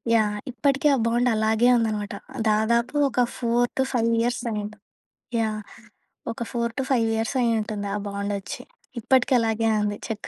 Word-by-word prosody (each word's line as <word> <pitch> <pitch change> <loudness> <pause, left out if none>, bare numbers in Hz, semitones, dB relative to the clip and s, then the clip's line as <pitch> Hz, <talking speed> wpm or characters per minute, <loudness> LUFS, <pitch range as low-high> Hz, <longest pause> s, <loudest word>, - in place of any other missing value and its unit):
Yeah! 210 -2 +2 0.2
ఇప్పటికే 275 +3 +2
ఆ 260 - -1
bond 240 +2 +2
అలాగే 220 +2 +3
ఉందనమాట. 210 -3 -2 0.4
దాదాపు 235 +5 +1
ఒక 250 - -3 0.2
4-5 240 0 +1
ఇయర్సయ్యుంటది. 220 -3 -2 0.6
యాహ్! 215 -1 -1 0.7
ఒక 235 - -5
4-5 235 0 0
ఇయర్సయ్యుంటుంది 225 -3 0
ఆ - - 0
బాండొచ్చి. 200 0 -4 0.4
ఇప్పటికి 260 +3 +3
అలాగే 225 0 +1
ఉంది 205 0 -1
చెక్కు 220 -2 -5
225 Hz, 115 wpm, -24 LUFS, 215-240 Hz, 0.7 s, అలాగే